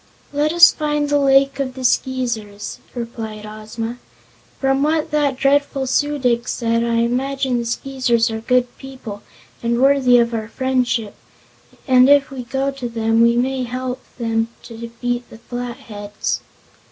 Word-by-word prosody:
"Let 295 +1 +1
us 345 0 +8
find 295 -1 -1
the 290 0 +3
Lake 275 0 +4
of 260 -2 -2
the 260 - -7
Skeezers," 235 -5 -1 0.2
replied 225 -3 -6
Ozma. 220 +3 -6 0.6
"From 270 0 +1
what 310 +2 +1
that 290 -3 +1
dreadful 275 0 +2
Su 290 +3 +1
dic 245 -3 +1
said 230 -1 0
I 235 0 0
imagine 255 +2 0
the 235 - -3
Skeezers 240 -2 0
are 220 - -3
good 250 +1 +1
people 255 -7 -8 0.4
and 235 0 0
worthy 265 -2 +5
of 235 0 +2
our 220 -1 -3
friendship, 250 -3 -1 0.7
and 255 0 +6
if 285 -1 +5
we 265 -2 -5
go 270 +3 -1
to 255 -3 -5
them 225 0 +1
we 235 0 +5
may 260 +1 0
help 255 +1 -4 0.2
them 225 -2 0 0.2
to 230 - -10
defeat 235 +1 -4
the - - -12
Flatheads." 230 -4 -5
250 Hz, 155 wpm, -20 LUFS, 230-270 Hz, 0.7 s, us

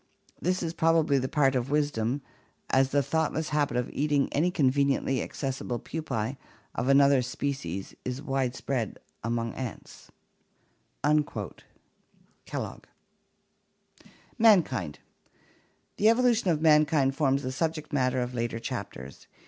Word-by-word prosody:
This 180 +1 0
is 165 -1 -2
probably 160 -4 +3
the 130 0 -2
part 140 -4 +3
of 125 0 -1
wisdom, 145 -3 0 0.5
as 130 0 +4
the 140 +1 +2
thoughtless 160 +2 -1
habit 145 -5 0
of 125 - 0
eating 145 -1 +1
any 160 +5 +2
conveniently 140 -4 +1
accessible 130 -3 -3
pupae 130 -5 -4 0.4
of 120 - -2
another 140 -1 +5
species 125 -8 -4
is 125 +1 -3
wide 135 -3 -1
spread 120 -6 -3 0.3
among 115 0 -1
ants" 125 -5 -8 0.9
(Kellogg). 150 0 -4 1.5
Mankind 160 - +4 1.0
The 215 - +5
evolution 235 -3 +3
of 155 -3 +1
mankind 150 -3 +4
forms 140 -2 +1
the 130 - -2
subject 160 +2 -3
matter 130 -2 +1
of 125 0 -3
later 115 -1 -2
chapters. 70 - -7
140 Hz, 115 wpm, -28 LUFS, 125-155 Hz, 1.5 s, another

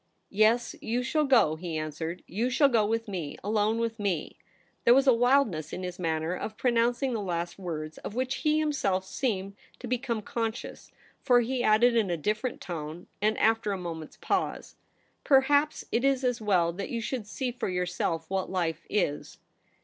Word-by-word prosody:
' - - -47
Yes, 220 +4 +3
you 240 +3 -1
shall 300 +4 +1
go,' 230 - +4
he 165 -1 -4
answered. 160 +3 -4
' - - -45
You 240 +3 +2
shall 275 +3 +4
go 230 -4 +3
with 225 +1 -1
me 175 -8 -5
— - - -30
alone 215 +2 +1
with 230 -1 -2
me.' 190 -7 -2 0.5
There 240 - +7
was 270 +1 +4
a 260 - +6
wildness 230 - +2
in 185 - -4
his 180 0 -5
manner 160 0 -1
of 215 +4 -5
pronouncing 240 +1 +1
the 220 - -2
last 175 -1 -3
words 155 -4 -5
of 210 - -7
which 255 +1 -1
he 305 -1 +2
himself 235 -12 0
seemed 195 -4 -2 0.2
to - - -9
become 240 -2 -2
conscious, 225 +1 -4 0.3
for 245 -1 +5
he 250 +2 -1
added 235 +2 +4
in 220 -5 +2
a 170 - 0
different 215 - -2
tone, 160 0 -6 0.2
and 215 +1 +2
after 220 -2 +2
a - - -2
moment's 165 -3 -7
pause, - - -2 0.2
' - - -38 0.2
Perhaps 285 +2 +3
it 240 - +1
is 270 -1 +2
as 245 -2 0
well 180 -5 +2
that 195 +3 -5
you 235 - -2
should 230 -1 -4
see 250 +3 -3
for 240 - -3
yourself 180 -2 -2
what 190 +1 -2
life 175 -4 -2
is.' 150 -8 -1
215 Hz, 195 wpm, -28 LUFS, 180-245 Hz, 0.5 s, There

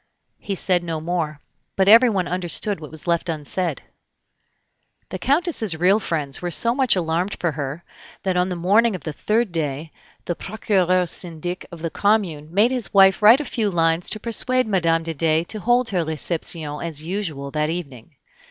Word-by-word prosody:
He 200 - -4
said 180 -1 +1
no 165 -2 -3
more, 155 -3 -3 0.3
but 190 0 +2
everyone 215 -4 +5
understood 180 +2 +1
what 155 -2 -9
was 155 -1 -6
left 170 0 0
unsaid. 160 0 -3 1.3
The 185 - -6
Countess's 275 - +1
real 185 +5 +3
friends 150 -9 -3
were 175 - -3
so 230 +7 +3
much 260 -4 +3
alarmed 175 +2 -1
for 170 - 0
her, 145 +2 -5 0.4
that 190 -2 0
on 180 +1 +1
the 180 - -3
morning 200 +6 +3
of 180 - -8
the 155 - -5
third 215 +6 0
day 155 -1 -3 0.3
the 175 - -1
Procureur 185 -3 0
Syndic 175 +1 -3
of 170 -1 -10
the 165 - -2
commune 180 -8 0
made 210 +7 +3
his 250 -3 -2
wife 195 0 +5
write 225 +7 +7
a - - -6
few 220 -6 -1
lines 165 -1 +1
to 215 - -5
persuade 255 +3 0
Mme. 165 -5 +1
de 165 0 -4
Dey 160 +1 +1
to 215 +5 -6
hold 245 +4 +1
her 180 -4 0
reception 160 -1 -2
as 160 -3 -5
usual 160 -6 -4
that 150 +1 -1
evening. 145 -5 -7
175 Hz, 180 wpm, -22 LUFS, 160-205 Hz, 1.3 s, write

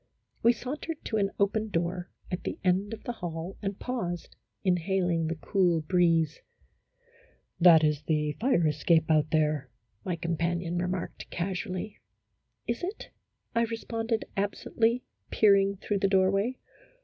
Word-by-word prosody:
We 235 - +6
sauntered 290 +7 -5
to 220 - -1
an 200 -2 +2
open 215 +2 +1
door 175 0 -2 0.2
at 180 - -2
the - - -3
end 190 +2 +2
of 225 - -7
the - - -3
hall 175 -3 -5
and 200 -1 -3
paused, 180 -9 -4 0.3
inhaling 180 -2 +1
the 165 - -2
cool 175 0 +2
breeze. 165 -2 +2 0.6
" 485 0 -33
That 165 -3 +8
is 150 -1 +2
the 150 -1 0
fire 235 -9 +3
escape 160 +2 +2
out 155 -1 +3
there," 150 -3 +1 0.3
my 180 - -1
companion 170 +1 -1
remarked, 180 0 -3
casually. 185 +3 -4 0.3
" - - -51
Is 235 - -1
it? 380 +5 -5 0.2
" - - -45
I 230 - +4
responded, 225 0 -2
absently, 225 +4 0 0.3
peering 200 -2 +4
through 200 +1 -1
the 195 - +3
doorway. 195 +6 +2
185 Hz, 145 wpm, -29 LUFS, 165-220 Hz, 0.6 s, That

